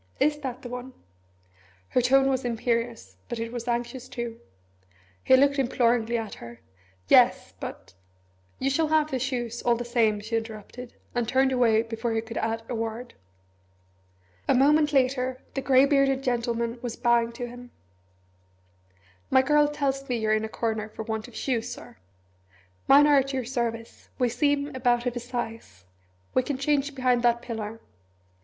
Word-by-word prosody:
Is 295 0 +2
it - - -16
that 255 -2 -6
one?" 250 +1 -7 1.0
Her 250 - +2
tone 270 +2 +4
was 265 -1 0
imperious, 235 0 -2
but 240 - -3
it 230 0 -4
was 240 0 -6
anxious 240 +1 -3
too. 235 -1 -5 0.8
He 260 - +6
looked 280 +1 +3
imploringly 240 -2 +1
at 225 -2 -5
her. 120 0 -10 0.5
"Yes, - - +4
but - - -8 0.3
" 95 0 -38
"You 270 +1 0
shall 315 +3 +2
have 310 0 +2
the 260 - -1
shoes, 240 -2 -3
all 240 -1 +2
the 240 +1 -5
same," 230 -3 +2
she 220 +2 -4
interrupted, 225 +2 -6 0.2
and 240 -2 -1
turned 265 0 +3
away 230 -3 +3
before 225 0 -3
he 225 - 0
could 230 0 -5
add 225 0 -2
a - - -4
word. 230 +1 -4 1.3
A - - +4
moment 295 +3 +4
later 260 -2 +1
the 270 - -2
grey 265 0 +5
bearded 275 -1 +2
gentleman 235 -1 -1
was 245 -3 -4
bowing 235 -1 +2
to 245 +1 -5
him. 245 +1 -11 1.6
"My 260 - +5
girl 295 +2 +4
tells 275 -2 -2
me 245 - 0
you're 215 -1 +1
in 215 0 +1
a 220 - -4
corner 220 -1 -2
for 220 - -7
want 220 0 -4
of 245 - -15
shoes, 245 -2 -2
Sir. - - -10 0.9
Mine 285 +2 +7
are 295 -1 +5
at 275 +1 -2
your 260 -2 -2
service 230 -2 -4
we 250 -1 +2
seem 285 +3 0
about 245 -1 +1
of 245 -1 -1
a - - -2
size 230 - -6 0.5
we 255 - +4
can 265 +1 -3
change 285 0 0
behind 255 -2 +2
that 235 0 +2
pillar." 225 -2 -5
245 Hz, 170 wpm, -26 LUFS, 230-265 Hz, 1.6 s, Mine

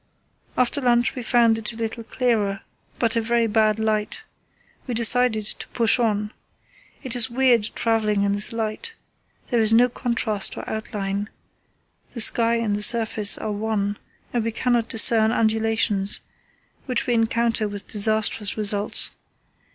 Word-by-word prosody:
After 255 +3 0
lunch 240 -2 +1
we 255 - -7
found 230 -1 +2
it 225 +1 -5
a - - -11
little 230 0 -5
clearer, 220 -5 -2 0.4
but 230 -1 +1
a 230 - +1
very 235 +1 0
bad 215 -1 +1
light. 220 - -2 0.6
We 245 - -4
decided 230 -1 +2
to - - -3
push 235 0 +2
on. 210 -2 -1 0.7
It 260 -3 -2
is 235 -2 +2
weird 240 -3 +1
travelling 215 -3 0
in 200 - 0
this 205 +1 -1
light. 230 - -5 0.6
There 240 - +1
is 220 -1 +3
no 240 +2 +4
contrast 230 -5 -2
or - - -8
outline; 205 -2 -5 0.9
the - - -5
sky 230 +1 +4
and 225 -3 -1
the 205 - -4
surface 220 -2 +5
are 215 - -5
one, 205 -1 -3 0.4
and 240 -2 -1
we 230 - -3
cannot 235 0 -1
discern 220 0 +6
undulations, 220 -3 0 0.7
which 250 -2 -1
we 245 - -1
encounter 230 -1 0
with 205 -1 -7
disastrous 215 0 0
results. 205 -1 0
225 Hz, 150 wpm, -22 LUFS, 210-235 Hz, 0.9 s, discern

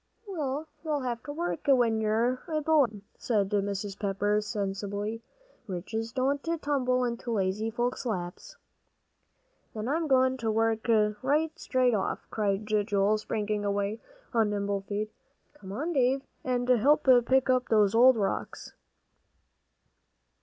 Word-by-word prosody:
"Well, 305 -5 -3 0.2
you'll 300 -3 -1
have 240 -2 -3
to 290 - -5
work 330 0 -4
when 240 -5 +3
you're 230 +4 +1
a 310 -2 -1
boy, 305 -2 +4
then," 205 -1 -12 0.2
said 205 -5 0
Mrs. 200 -1 -2
Pepper, 205 +1 0
sensibly. 205 +1 -3 0.5
"Riches 220 +5 -4
don't 270 +3 0
tumble 280 -6 0
into 235 0 -4
lazy 210 0 0
folks' 240 +3 -2
laps." 180 -5 -5 1.2
"Then 215 +1 -4
I'm 315 +4 0
goin' 260 -1 +3
to 230 -3 -2
work 225 +1 0 0.3
right 300 +4 +1
straight 255 -2 +2
off," 205 - -2
cried 205 -1 -1
Joel, 210 -1 +1
springing 210 -1 -2
away 205 +2 -1 0.3
on 225 -3 +3
nimble 200 -1 -1
feet. 205 +2 -4 0.4
"Come 195 -10 -11
on, 305 - -3
Dave, 265 -1 +2 0.2
and 250 -1 -1
help 265 +5 +3 0.2
pick 265 0 +3 0.2
those 210 -2 +4
old 245 +2 +6
rocks." 200 -2 -3
225 Hz, 130 wpm, -28 LUFS, 205-260 Hz, 1.2 s, old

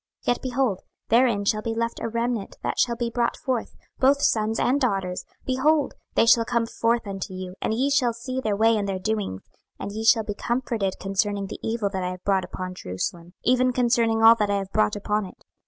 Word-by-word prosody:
26:014:022 - - -17
Yet, 245 - +1
behold, 255 -6 0 0.3
therein 230 -4 +3
shall 215 +1 +1
be 225 +1 -3
left 230 0 -2
a 230 - -3
remnant 235 -2 -2
that - - -2
shall 240 -1 +2
be 235 0 -2
brought 235 0 0
forth, 255 -4 -3 0.2
both 275 +2 +4
sons 220 0 +1
and 275 +4 +2
daughters: 195 -7 -1 0.2
behold, 285 +3 +2 0.2
they - - +5
shall 230 0 +6
come 235 0 0
forth 230 0 0
unto 195 -1 -5
you, 185 -1 -6
and 220 - 0
ye 270 +4 +1
shall 255 -4 +3
see 255 +3 -4
their 215 -4 0
way 225 +2 +4
and 200 -1 -2
their 190 - -1
doings: 200 - -2 0.3
and - - -5
ye 220 +2 -4
shall 225 0 +5
be 210 - -4
comforted 230 -3 -2
concerning 200 +1 -1
the - - -7
evil 225 -2 -1
that 190 -2 -3
I 180 - -1
have 185 0 -8
brought 195 -2 +2
upon 185 0 -6
Jerusalem, 170 - -5
even 255 +1 +3
concerning 235 -2 +2
all 225 +1 +10
that 210 -2 0
I 200 - +2
have 195 -1 -5
brought 105 0 +2
upon 210 +1 -1
it. - - -17
225 Hz, 220 wpm, -25 LUFS, 195-240 Hz, 0.3 s, all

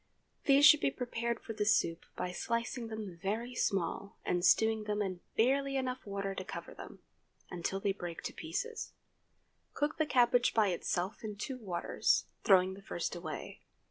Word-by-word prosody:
These 280 +1 +7
should 305 - +9
be - - +2
prepared 235 -3 -3
for 225 - -7
the 210 -1 -1
soup 170 -6 +2
by 180 - -3
slicing 230 +4 -2
them 215 -6 -6
very 225 +5 -2
small, 200 -2 -1
and 175 -1 0
stewing 220 +1 +4
them 210 0 -1
in 190 -3 -2 0.2
barely 275 +4 +3
enough 255 -3 -3
water 195 -1 -2
to 190 - -5
cover - - -7
them, - - -11 0.5
until 180 +2 -2
they 200 0 +1
break 175 -3 -6
to - - -4
pieces. 470 -2 -4 0.8
Cook 295 +2 -1
the 315 - +2
cabbage 245 -2 +4
by 215 -3 +4
itself 180 +3 -2
in 210 -1 -4
two 255 +5 -5
waters—throwing 185 -1 +2
the 195 - -11
first 175 -2 -3
away. 165 -3 -6
215 Hz, 165 wpm, -33 LUFS, 190-245 Hz, 0.8 s, should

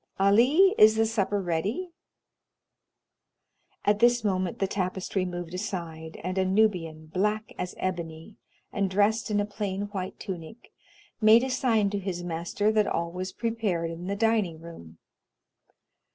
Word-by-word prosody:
Ali, 250 - +5
is 215 +1 +8
the 225 0 +3
supper 205 -2 0
ready?" 195 - -2 1.9
At 205 0 +3
this 240 0 +4
moment 185 -3 -1
the 195 - +1
tapestry 190 0 -2
moved 175 -1 -6
aside, 170 -5 -5
and 185 +2 -2
a - - +3
Nubian, 185 -6 +1
black 210 +6 -1
as 180 - -4
ebony, 170 +1 -5 0.4
and 200 -2 0
dressed 210 +4 +1
in 205 -1 +1
a 205 - +1
plain 205 -1 -4
white 190 -2 -5
tunic, 185 +3 -8 0.5
made 220 +2 +7
a 265 - -2
sign 225 -6 +2
to 205 - -1
his 185 -2 -4
master 175 +5 -1
that 215 -1 +2
all 170 0 -1
was 185 +1 -5
prepared 200 -7 -2
in 170 +2 -7
the 200 - -1
dining 210 -6 +1
room. 120 - -12
195 Hz, 145 wpm, -27 LUFS, 175-215 Hz, 1.9 s, is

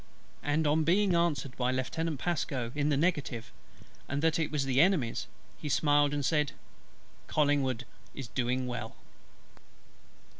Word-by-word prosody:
and 150 +2 +1
on 155 +2 +3
being 185 +4 +3
answered 155 -6 0
by 125 0 +1
Lieutenant 145 +4 -2
PASCO 140 -8 -2
in 150 0 0
the 145 - +2
negative, 145 -8 -1 0.6
and 140 +2 -2
that 165 0 +3
it 155 -2 0
was 145 -3 -1
the 135 0 +3
Enemy's, 165 -10 +2 0.3
he 150 - -4
smiled, 145 0 +3
and 145 -2 -1
said: 150 0 +1 0.7
"COLLINGWOOD 140 -5 +1 0.3
is 135 -3 -6
doing 125 +1 -1
well." 125 -1 -5
145 Hz, 140 wpm, -30 LUFS, 130-160 Hz, 0.7 s, on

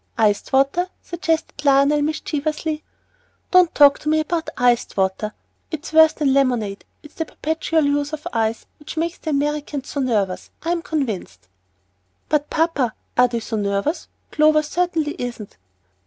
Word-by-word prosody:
"Iced 210 -2 +1
water," 275 +7 +2
suggested 325 -3 -2
Lionel, 280 +1 +4
mischievously. 305 +1 -2 0.7
"Don't 365 -2 +5
talk 285 -1 +6
to 305 - -3
me 310 0 +3
about 325 +1 -2
iced 245 -3 +2
water. 190 +2 0 0.4
It's 315 0 -6
worse 320 0 +7
than 280 -3 +1
lemonade. 245 -7 0 0.2
It's 300 - -14
the 325 - -3
perpetual 320 +1 -1
use 285 +1 0
of 305 -1 -6
ice 225 0 -1
which 295 +2 -9
makes 335 +2 -2
the 315 - -5
Americans 290 -1 -2
so 285 - -3
nervous, 210 -8 -1
I 335 - -1
am 345 -1 0
convinced." 220 - -4 0.8
"But, 295 -1 +1
papa, 315 -8 0 0.2
are 250 0 +5
they 235 -1 -3
so 220 0 -4
nervous? 200 - -1 0.2
Clover 305 0 +4
certainly 325 -1 -1
isn't." 240 -4 -6
295 Hz, 150 wpm, -21 LUFS, 245-315 Hz, 0.8 s, worse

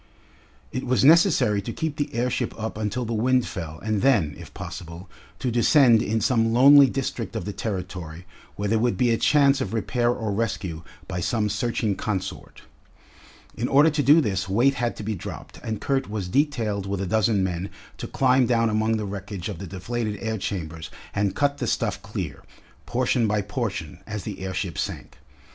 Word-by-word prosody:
It 130 - -3
was 130 +1 +2
necessary 155 - +5
to 110 - -5
keep 160 +3 -3
the 145 - -2
airship 125 +1 -1
up 110 0 -4
until 110 +3 -2
the 115 - -3
wind 125 +3 +2
fell 80 -4 -6
and 110 -2 0
then, 105 - +3
if - - -11
possible, 85 +2 -8 0.3
to 125 - -2
descend 120 -1 +5
in 110 0 0
some 115 -4 +2
lonely 140 +4 +8
district 120 -5 -3
of 110 - -3
the 105 - -4
Territory 90 -5 -5 0.3
where 105 - -2
there 110 +2 +2
would 120 +1 +1
be 125 -2 +3
a 115 - +2
chance 140 0 +4
of 120 - -3
repair 120 +2 0
or 110 -3 -1
rescue 95 -6 -2 0.3
by 90 -2 -3
some 105 +4 0
searching 105 0 -1
consort. 95 -3 -5 0.9
In 120 - -2
order 145 +4 +5
to 150 0 0
do 150 +4 +6
this 100 -6 -2
weight 120 +8 +3
had 120 -3 -2
to - - -7
be 110 +1 -2
dropped, 95 - -8
and 110 -3 -4
Kurt 135 -5 -1
was 105 -4 -3
detailed 110 -5 0
with 100 -1 -2
a 100 - -2
dozen 105 0 +2
men 90 +1 -2 0.3
to - - -4
climb 130 -1 +3
down 115 -2 +2
among 110 +1 +1
the 105 - -3
wreckage 100 -1 -5
of 100 - -6
the 95 - -6
deflated 105 +4 -3
air 110 -1 -3
chambers 80 -5 -5 0.2
and 100 -2 0
cut 145 0 +1
the - - -2
stuff - - -1
clear, - - -6 0.4
portion 125 -2 +1
by 105 -1 0
portion, 100 -6 -4
as 105 -3 -5
the 100 -1 -6
airship 95 -2 -3
sank. - - -5
110 Hz, 190 wpm, -24 LUFS, 100-125 Hz, 0.9 s, lonely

